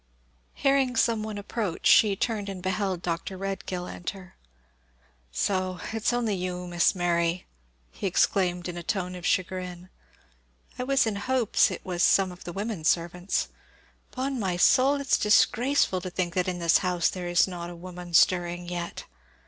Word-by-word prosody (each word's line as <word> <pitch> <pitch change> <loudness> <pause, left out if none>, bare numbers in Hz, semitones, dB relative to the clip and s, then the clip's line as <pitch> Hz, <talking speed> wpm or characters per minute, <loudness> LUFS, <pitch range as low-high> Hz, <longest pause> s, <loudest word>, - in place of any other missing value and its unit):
Hearing 275 -2 +2
some 225 -1 +2
one 215 -1 -5
approach, 205 -3 -4
she 205 -3 +6
turned 205 -1 -2
and 195 -2 -6
beheld 185 -1 -1
Dr. 170 +2 -3
Redgill 190 -2 -4
enter. 180 +1 -7 1.0
"So 185 - -1
it's 225 +1 0
only 240 -3 0
you, 180 -1 -3
Miss 175 +2 +2
Mary!" 170 0 0 0.6
exclaimed 180 -1 +1
he 180 - -3
in 175 - -9
a - - -4
tone 180 +1 -2
of 180 -2 -4
chagrin. 180 -1 -2 0.9
"I 250 - -2
was 270 -1 +3
in 215 -2 -2
hopes 250 +1 +2
it - - -7
was 180 -2 -2
some 190 0 +4
of 180 - -13
the 175 - -5
women 200 -2 -4
servants. 175 +3 0 0.6
'Pon 260 0 -3
my 185 -4 -1
soul, 270 +9 +5
it's 280 - +1
disgraceful 220 -1 +3
to 185 - -5
think 175 -1 -2
that 180 0 0
in 180 -1 -2
this 170 -1 +3
house 180 -2 +1
there 180 -2 -4
is 175 +1 +3
not 175 -2 -6
a 175 - -8
woman 175 0 -7
stirring 175 0 +3
yet! 175 -1 -5
185 Hz, 165 wpm, -27 LUFS, 175-210 Hz, 1.0 s, she